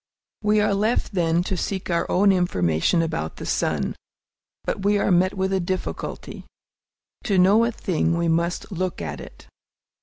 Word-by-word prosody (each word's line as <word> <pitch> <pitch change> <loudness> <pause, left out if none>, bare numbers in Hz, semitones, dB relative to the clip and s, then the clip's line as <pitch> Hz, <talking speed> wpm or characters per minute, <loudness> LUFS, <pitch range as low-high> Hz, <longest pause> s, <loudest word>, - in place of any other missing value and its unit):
We 210 0 +3
are 210 -1 +2
left, 215 +3 0
then, 170 -2 +1
to 190 - -2
seek 190 +1 -3
our 170 - 0
own 200 +2 +4
information 165 - +1
about 80 - -3
the - - -8
sun. - - -1 0.7
But 195 - -3
we 205 +1 +3
are 200 - +1
met 185 +2 +3
with 190 0 -1
a 190 - +2
difficulty. 185 +1 -4 0.8
To 200 -4 +1
know 200 +5 +5
a 235 - 0
thing, 170 -6 -1
we 170 0 0
must 170 +4 -1
look 185 -1 -3
at 75 -3 -5
it. - - -13
185 Hz, 170 wpm, -23 LUFS, 170-200 Hz, 0.8 s, know